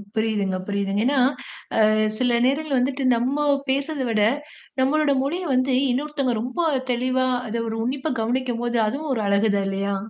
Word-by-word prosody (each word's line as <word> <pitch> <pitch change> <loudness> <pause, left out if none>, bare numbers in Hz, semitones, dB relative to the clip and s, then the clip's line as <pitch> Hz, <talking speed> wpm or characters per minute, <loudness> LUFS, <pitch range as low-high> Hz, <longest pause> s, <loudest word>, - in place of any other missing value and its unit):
புரியுதுங்க, 210 -4 0
புரியுதுங்க. 200 0 -1
ஏனா, 275 0 +2 0.7
அ - - +5 0.3
சில 245 -2 +2
நேரங்கள்ல 280 +1 +1
வந்துட்டு 270 +2 -1
நம்ம 270 +5 0 0.2
பேசுறத 280 +2 -1
விட, 215 -2 +1 0.6
நம்மளோட 290 +2 +2
மொழிய 345 +6 -2
வந்து 255 +1 +2 0.2
இன்னொருத்தங்க 275 -1 -1
ரொம்ப 250 +7 -5 0.3
தெளிவா 255 +1 +1 0.2
அத 225 - -5
ஒரு 220 - -3
உன்னிப்பா 265 +4 -2
கவனிக்கும்போது 240 0 -1
அதுவும் 280 +5 -3
ஒரு 225 - -1
அழகு 200 +2 +2
தான் 200 - 0
இல்லையா? 195 +1 -1
255 Hz, 150 wpm, -23 LUFS, 220-275 Hz, 0.7 s, அ